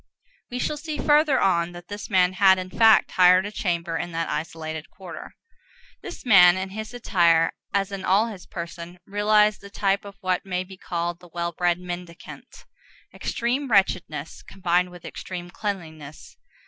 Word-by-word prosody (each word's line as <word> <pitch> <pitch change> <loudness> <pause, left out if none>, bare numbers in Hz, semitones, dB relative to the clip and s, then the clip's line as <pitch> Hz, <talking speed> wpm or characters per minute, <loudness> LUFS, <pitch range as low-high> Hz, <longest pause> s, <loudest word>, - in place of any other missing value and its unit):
We 245 - -5
shall 295 +4 -2
see 305 0 -5
further 295 -1 +3
on 175 -2 +1
that 175 0 -11
this 205 +1 -7
man 185 -2 +3
had, 190 -1 +5
in 185 0 -6
fact, 225 -1 +5
hired 185 +1 +5
a 205 - -5
chamber 170 -5 -2
in 175 - -4
that 165 0 -2
isolated 160 0 -5
quarter. 185 -4 -10 0.7
This - - -9
man, 185 -6 +7
in 190 0 -4
his 220 +2 -6
attire, 170 -9 +2 0.2
as 200 0 0
in 195 -1 -5
all 195 +4 +3
his 205 -6 -9
person, 170 0 -8
realized 210 +1 +2
the 200 - -11
type 200 -1 0
of 200 -1 -11
what 185 -2 0
may 185 -1 -2
be 190 +1 -12
called 175 -1 -4
the 175 - -16
well 170 0 -3
bred 175 0 0
mendicant,—extreme 180 +8 -6
wretchedness 180 -7 0
combined 180 -1 0
with 175 -1 -13
extreme 175 -1 -7
cleanliness. 160 -8 -7
185 Hz, 160 wpm, -24 LUFS, 175-205 Hz, 0.7 s, man